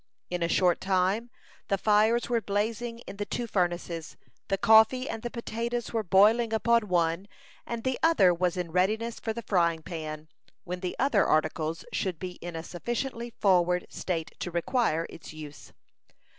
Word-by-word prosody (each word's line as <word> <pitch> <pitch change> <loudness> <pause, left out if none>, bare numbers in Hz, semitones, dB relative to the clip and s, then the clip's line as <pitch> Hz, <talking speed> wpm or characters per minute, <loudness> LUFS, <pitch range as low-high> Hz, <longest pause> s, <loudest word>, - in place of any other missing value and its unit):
In 180 -1 -2
a 170 - +2
short 175 +1 +2
time 190 +5 +1 0.4
the 195 - +1
fires 215 +4 +3
were 235 -2 +1
blazing 225 +3 -2
in - - -9
the 205 - -2
two 240 - -2
furnaces, 175 -5 -2 0.3
the 195 - 0
coffee 220 +6 +5
and 225 - -4
the 240 - -4
potatoes 235 0 -4
were 225 - +1
boiling 215 +5 +4
upon 230 0 +2
one, 175 +1 +1 0.4
and 235 -1 -4
the 260 -1 -1
other 260 - +5
was 180 +1 0
in 175 -2 -3
readiness 215 +6 0
for 225 - -3
the 235 +1 -5
frying 170 -4 +1
pan, 155 -3 -6 0.4
when 180 +1 -5
the 180 -1 -4
other 250 -6 +3
articles 155 +1 0
should 185 -4 -1
be 180 +1 -7
in 175 -1 -6
a 160 - -4
sufficiently 235 +6 -4
forward 180 -2 +3
state 165 -3 -3
to - - -3
require 170 -1 0
its 160 - -11
use. 150 -2 -10
190 Hz, 170 wpm, -28 LUFS, 175-230 Hz, 0.4 s, coffee